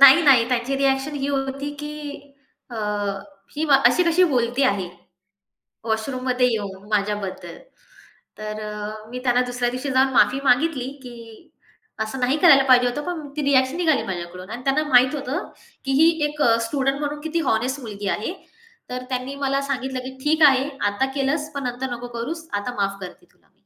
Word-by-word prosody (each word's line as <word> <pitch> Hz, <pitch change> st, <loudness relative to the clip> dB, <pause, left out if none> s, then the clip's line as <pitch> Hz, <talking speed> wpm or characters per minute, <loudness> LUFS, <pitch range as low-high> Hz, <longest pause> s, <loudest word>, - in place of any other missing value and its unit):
नाही, 280 Hz, +4 st, +9 dB
नाही. 255 Hz, -6 st, +5 dB
त्यांची 250 Hz, +2 st, 0 dB
रिएक्शन 270 Hz, +1 st, 0 dB
ही 275 Hz, 0 st, -2 dB
होती, 275 Hz, +1 st, -2 dB
की 295 Hz, -1 st, -8 dB, 0.4 s
अ, 235 Hz, -, -7 dB, 0.8 s
ही 310 Hz, -, 0 dB, 0.2 s
अशी 360 Hz, -, +4 dB
कशी 340 Hz, +2 st, +4 dB
बोलती 245 Hz, +1 st, +1 dB
आहे 200 Hz, -8 st, +1 dB, 1.0 s
वॉशरूममध्ये 250 Hz, +3 st, 0 dB
येऊन 200 Hz, -3 st, -5 dB
माझ्याबद्दल. 205 Hz, -2 st, -2 dB, 0.8 s
तर 215 Hz, 0 st, -6 dB
अ, 210 Hz, +1 st, -7 dB
मी 250 Hz, -, -5 dB
त्यांना 250 Hz, -1 st, +3 dB
दुसऱ्या 245 Hz, 0 st, -1 dB
दिवशी 255 Hz, +3 st, -4 dB
जाऊन 265 Hz, +1 st, +3 dB
माफी 255 Hz, +2 st, +4 dB
मागितली, 270 Hz, 0 st, +2 dB, 0.2 s
की 240 Hz, +5 st, -12 dB, 0.5 s
असं 220 Hz, +5 st, -6 dB
नाही 255 Hz, +4 st, +1 dB
करायला 300 Hz, -5 st, +7 dB
पाहिजे 250 Hz, -1 st, +6 dB
होतं, 245 Hz, +4 st, -2 dB
पण 330 Hz, -4 st, -4 dB
ती -, -, 0 dB
रिएक्शन 270 Hz, +1 st, +2 dB
निघाली 320 Hz, -5 st, +2 dB
माझ्याकडून 180 Hz, 0 st, -6 dB
आणि 245 Hz, +2 st, -6 dB
त्यांना 275 Hz, +3 st, +2 dB
माहीत 255 Hz, +2 st, +5 dB
होतं, 280 Hz, -1 st, -4 dB, 0.4 s
की 270 Hz, -, -1 dB
ही 325 Hz, -, +7 dB, 0.2 s
एक 295 Hz, 0 st, -7 dB
अ, 230 Hz, -4 st, +5 dB
स्टुडंट 270 Hz, +1 st, 0 dB
म्हणून 295 Hz, 0 st, -3 dB
किती 320 Hz, +2 st, -2 dB
होनेस्ट 255 Hz, +5 st, 0 dB
मुलगी 205 Hz, -4 st, -6 dB
आहे. 220 Hz, +11 st, -4 dB, 0.6 s
तर 250 Hz, 0 st, -4 dB
त्यांनी 255 Hz, +1 st, -3 dB
मला 275 Hz, 0 st, 0 dB
सांगितलं, 265 Hz, -1 st, -3 dB
की 260 Hz, +1 st, -8 dB
"ठीक 315 Hz, +2 st, +1 dB
आहे, 265 Hz, 0 st, +3 dB, 0.2 s
आता 205 Hz, +6 st, 0 dB
केलंस 290 Hz, +2 st, -1 dB
पण 280 Hz, -1 st, -4 dB
नंतर 250 Hz, +1 st, -3 dB
नको 240 Hz, +1 st, -7 dB
करूस, 325 Hz, +8 st, -5 dB
आता 205 Hz, +4 st, -2 dB
माफ 200 Hz, -1 st, -1 dB
करते 185 Hz, -, -10 dB
तुला -, -, -33 dB
मी." -, -, -40 dB
260 Hz, 170 wpm, -22 LUFS, 235-280 Hz, 1.0 s, नाही